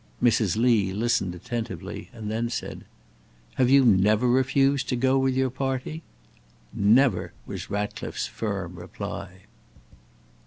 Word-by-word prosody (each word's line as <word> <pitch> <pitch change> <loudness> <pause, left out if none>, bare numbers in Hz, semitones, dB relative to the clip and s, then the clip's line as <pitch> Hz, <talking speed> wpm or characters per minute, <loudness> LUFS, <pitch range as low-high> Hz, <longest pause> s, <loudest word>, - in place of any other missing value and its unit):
Mrs. 110 -5 +2
Lee 110 -5 +3
listened 100 -4 0
attentively, 100 -1 -6
and 110 -4 -6
then 115 +2 -1
said: 115 - -5 0.8
"Have 125 - +4
you 135 0 +6
never 105 +2 +4
refused 130 +2 +2
to - - +1
go 130 +2 +2
with 135 -1 +1
your 130 -1 +1
party?" 135 +4 -3 0.7
"Never!" 110 0 +3
was - - -7
Ratcliffe's 105 0 -3
firm 95 -5 -4
reply. 85 - -7
120 Hz, 120 wpm, -25 LUFS, 100-130 Hz, 0.8 s, you